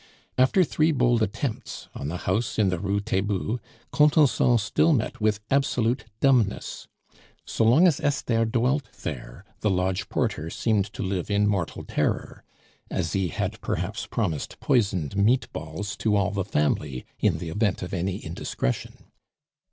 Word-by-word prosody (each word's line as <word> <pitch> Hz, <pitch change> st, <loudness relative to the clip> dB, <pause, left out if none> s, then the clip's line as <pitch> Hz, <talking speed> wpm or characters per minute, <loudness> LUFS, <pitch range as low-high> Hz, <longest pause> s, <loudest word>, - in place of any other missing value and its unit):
After 130 Hz, +9 st, +4 dB
three 155 Hz, 0 st, +2 dB
bold 120 Hz, -4 st, +2 dB
attempts 115 Hz, +3 st, -3 dB
on 70 Hz, -, -5 dB
the 85 Hz, +4 st, -3 dB
house 105 Hz, +5 st, 0 dB
in 105 Hz, -3 st, +3 dB
the 90 Hz, -2 st, -1 dB
Rue 100 Hz, +1 st, 0 dB
Taitbout, 100 Hz, +3 st, -1 dB, 0.3 s
Contenson 150 Hz, -5 st, +4 dB
still 115 Hz, +10 st, +2 dB
met 115 Hz, -4 st, -1 dB
with 105 Hz, -1 st, +1 dB
absolute 125 Hz, -3 st, +1 dB, 0.2 s
dumbness. 125 Hz, -7 st, +1 dB, 0.6 s
So 115 Hz, -, 0 dB
long 130 Hz, +11 st, +6 dB
as 170 Hz, -6 st, +4 dB
Esther 115 Hz, -5 st, +1 dB
dwelt 125 Hz, +5 st, 0 dB
there -, -, -6 dB
the 105 Hz, -, +1 dB
lodge 95 Hz, 0 st, 0 dB
porter 80 Hz, +2 st, -1 dB
seemed 105 Hz, +1 st, +1 dB
to -, -, -4 dB
live 95 Hz, -1 st, -2 dB
in 105 Hz, 0 st, +2 dB
mortal 95 Hz, -6 st, -1 dB
terror. -, -, -2 dB, 0.5 s
Asie 95 Hz, -2 st, -1 dB
had, 80 Hz, -, -3 dB
perhaps, -, -, -3 dB
promised 75 Hz, -3 st, -2 dB
poisoned 100 Hz, -, +1 dB
meat 115 Hz, +6 st, +3 dB
balls 80 Hz, +7 st, -5 dB
to 110 Hz, -2 st, +1 dB
all 100 Hz, -1 st, +2 dB
the 100 Hz, -2 st, -2 dB
family 75 Hz, -6 st, -1 dB
in -, -, +2 dB
the 85 Hz, -, -5 dB
event 100 Hz, +2 st, 0 dB
of 90 Hz, -, -6 dB
any 95 Hz, +1 st, -1 dB
indiscretion. 60 Hz, -, -3 dB
105 Hz, 150 wpm, -26 LUFS, 95-125 Hz, 0.6 s, long